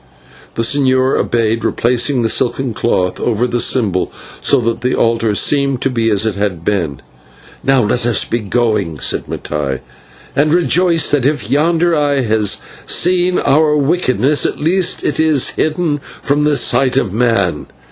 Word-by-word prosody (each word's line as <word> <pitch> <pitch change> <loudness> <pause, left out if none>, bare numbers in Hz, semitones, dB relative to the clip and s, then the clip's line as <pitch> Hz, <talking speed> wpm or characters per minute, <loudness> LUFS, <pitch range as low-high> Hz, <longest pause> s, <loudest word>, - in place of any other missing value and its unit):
The 115 - -1
señor 130 +1 +2
obeyed, 115 -1 0
replacing 125 +2 0
the - - +2
silken 125 +2 0
cloth 90 -5 -1
over 120 0 0
the 120 -1 -2
symbol, 105 -7 0 0.3
so - - +3
that 115 0 -2
the 125 +1 0
altar 115 -2 0
seemed 140 +1 +1
to 135 - 0
be 115 -2 0
as 105 0 +1
it 110 - 0
had 95 -4 -3
been. 85 -10 -2 0.6
"Now 135 -2 +2
let 115 +3 -1
us 120 - +1
be 120 - -2
going," 105 -6 -1
said - - -1
Mattai, 70 -3 -4 0.5
"and 150 +2 +2
rejoice, 175 -1 +2
that 140 -3 +2
if 145 -2 -2
yonder 165 +3 +2
eye 145 -2 +1
has 110 -4 +1 0.3
seen 180 0 +2
our 150 +1 +2
wickedness, 145 -2 +1
at - - -2
least 175 +4 0
it 145 - -2
is 155 -4 +2
hidden 155 -1 -1
from 145 +1 -3
the 150 -1 +2
sight 135 -1 +2
of 110 -8 0
man. 105 -9 0
125 Hz, 160 wpm, -15 LUFS, 110-150 Hz, 0.6 s, so